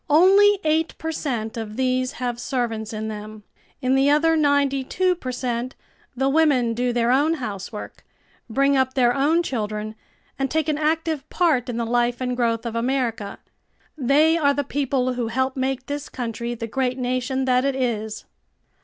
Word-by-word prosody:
"Only 390 +6 +6
eight 315 +1 +1
per 320 0 -3
cent 235 -8 -3
of 220 -1 -6
these 255 0 0
have 245 -1 -3
servants 230 -4 -2
in 215 0 -4
them. 215 0 -7 0.4
In 255 +1 +2
the 270 +1 +4
other 325 +3 +4
ninety 285 -3 +2
two 365 +7 +1
per 265 -8 -5
cent 250 0 -3 0.4
the 265 +2 +1
women 275 -5 +3
do 245 +1 0
their 240 0 +1
own 295 +5 +3
housework; 210 - -7 0.5
bring 275 +4 +2
up 260 -1 +1
their 245 -2 +4
own 305 +6 +2
children, 215 -6 -3 0.5
and 270 0 0
take 315 -1 0
an 305 -1 0
active 315 -1 -1
part 300 -9 +1
in 235 - -3
the 235 - -1
life 240 +1 +1
and 250 -1 -2
growth 230 -1 0
of 230 -1 -4
America. 230 -4 -1 0.6
They 305 +4 +3
are 285 -2 +3
the 285 - 0
people 270 -2 -1
who 245 -2 -2
help 260 +3 -1
make 260 0 -2
this 290 +1 -5
country 235 -1 -4
the 230 - -5
great 255 +2 -1
nation 255 +1 -1
that 255 0 +3
it 275 -1 0
is." 220 -5 -2
255 Hz, 175 wpm, -23 LUFS, 235-285 Hz, 0.6 s, Only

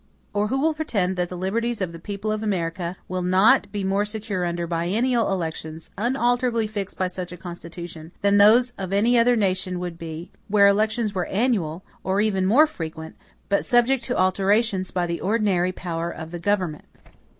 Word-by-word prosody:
Or 205 0 +1
who 265 +5 -1
will 315 +3 +2
pretend 205 -12 -1
that 175 -1 -1
the 180 - -6
liberties 230 +6 -1
of 185 -3 -2
the 165 - -9
people 205 +4 -4
of 215 0 -2
America 175 -3 -2
will 185 0 -3
not 200 +5 +4
be 205 -2 -3
more 195 +2 +1
secure 210 -3 -3
under 170 0 -2
biennial 205 +9 0
elections, 160 -3 -4
unalterably 240 +1 +1
fixed 205 -2 -5
by 185 - +1
such 180 -1 -5
a 180 - -8
Constitution, 170 -2 -9
than 200 0 +4
those 235 +5 +6
of 190 0 -4
any 225 +5 +3
other 240 +1 +4
nation 185 -3 0
would 175 -1 -5
be, 165 +2 -7 0.2
where 205 0 +5
elections 215 +2 +2
were 180 -2 -2
annual, 190 -7 0 0.2
or 190 +1 0
even 195 -3 +1
more 265 +10 +6
frequent, 160 - -7 0.3
but 200 - +1
subject 245 +1 +3
to 250 - -1
alterations 195 +1 +2
by 180 -1 -1
the 170 -1 -3
ordinary 195 -4 +1
power 170 -2 -4
of 160 -1 -8
the 175 - -5
government? 180 -4 -1
195 Hz, 185 wpm, -24 LUFS, 175-220 Hz, 0.3 s, those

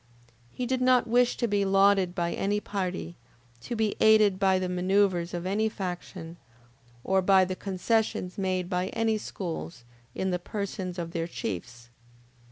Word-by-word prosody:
He 250 - -4
did 255 +1 -1
not 255 -1 +4
wish 245 +1 +2
to 235 - 0
be 205 -2 +1
lauded 195 -2 +3
by 170 -2 -1
any 205 +1 0
party, 185 -4 -4 0.4
to 240 - -5
be 220 -2 0
aided 215 -3 +5
by 190 -1 +3
the 185 0 -1
manoeuvres 180 -1 +1
of 175 0 -4
any 210 +4 +1
faction, 175 -3 -6 0.7
or 190 0 +2
by 190 0 +5
the 185 0 -4
concessions 195 0 -1
made 185 -2 -1
by 180 0 -1
any 225 -1 +1
schools 170 -8 -6 0.3
in 190 0 -1
the 180 - -1
persons 190 -1 -5
of 170 -1 -4
their 165 -1 -2
chiefs. 120 - -6
190 Hz, 160 wpm, -28 LUFS, 180-205 Hz, 0.7 s, aided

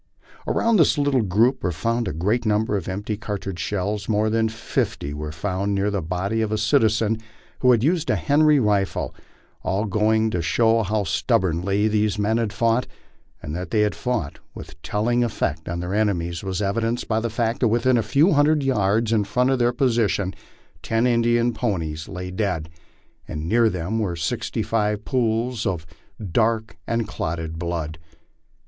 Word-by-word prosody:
Around 230 -1 +2
this 160 - +4
little 140 -3 +2
group 110 +6 +2
were 90 - 0
found 115 +6 -1
a - - -1
great 105 +10 0
number 105 -1 +1
of 95 -3 -3
empty 100 +3 -3
cartridge 100 -3 -5
shells; 105 +2 -2
more 110 0 +2
than 110 0 +2
fifty 90 -9 -3
were 75 +1 -5
found 100 +4 -2
near 100 +1 +1
the 100 -2 -1
body 90 +7 -2
of 110 -1 -1
a 110 - +1
citizen 110 -1 +2 0.4
who 125 - +3
had 120 -2 +4
used 165 +2 +1
a - - +3
Henry 150 0 +4
rifle; 105 -4 0 0.5
all 100 +4 -1
going 110 +2 +2
to 90 - -1
show 115 +6 +2
bow 105 -1 +1
stubbornly 95 +2 +1
these 105 -1 +1
men 105 +2 +1
had 115 -3 -1
fought, 115 +2 +1 0.6
and 75 - -5
that 90 -1 -5
they 105 - +2
had 105 -1 +2
fought 125 - -3 0.2
with 80 0 -11
telling 120 +6 0
effect 80 -9 -2
on 85 0 -3
their 90 +2 -4
enemies 90 -5 0
was 95 +1 -2
evidenced 115 +4 -1
by 110 -1 +1
the 115 +1 -2
fact 115 +1 -1
that 125 - +3
within 120 +3 +2
a 115 - +3
few 140 - +3
hundred 150 0 +3
yards 110 -3 +1
in 105 -2 +3
front 125 +6 +1
of 130 - +1
their 120 0 +3
position 115 -6 +1 0.5
ten 115 +1 0
Indian 120 0 +2
ponies 80 -10 -3
lay 90 0 -6
dead, 90 -5 -2 0.6
and 75 +1 -5
near 115 +4 +3
by - - +5
them 90 +7 -2
were 95 -6 -1
sixty 85 -2 -2
five 105 -1 -1
pools 115 -2 0
of 85 -5 -2 0.5
dark 110 +3 +1
and 115 -2 -1
clotted 80 -3 -4
blood. 80 -2 -3
105 Hz, 180 wpm, -23 LUFS, 95-115 Hz, 0.6 s, by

